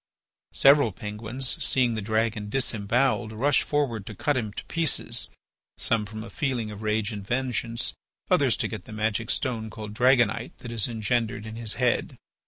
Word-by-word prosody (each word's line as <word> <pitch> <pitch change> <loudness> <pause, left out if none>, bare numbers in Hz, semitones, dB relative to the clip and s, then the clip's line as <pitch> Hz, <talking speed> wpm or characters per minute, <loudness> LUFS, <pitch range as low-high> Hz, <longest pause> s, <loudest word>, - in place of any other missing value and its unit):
Several 140 -4 +6
Penguins, 110 +7 -2
seeing 125 -3 +2
the 110 - -2
dragon 110 0 0
disembowelled, 115 0 +1
rushed 135 +6 +3
forward 125 -9 -1
to 110 - -6
cut 145 +8 +1
him 110 -5 -1
to - - -7
pieces, 165 -3 0 0.5
some 110 -3 +1
from 110 +1 -7
a 115 - -10
feeling 125 -6 -1
of 105 0 -8
rage 110 +1 0
and 105 -2 -5
vengeance, 120 0 -1 0.3
others - - +3
to - - 0
get - - -7
the - - -9
magic 110 +1 -1
stone 115 -5 -1
called 105 -1 -7
dragonite, 120 -1 +3
that 120 - -8
is 115 -3 +1
engendered 110 -2 -1
in 110 0 -7
his 115 -2 -1
head. 125 -1 +1
115 Hz, 170 wpm, -26 LUFS, 110-125 Hz, 0.5 s, Several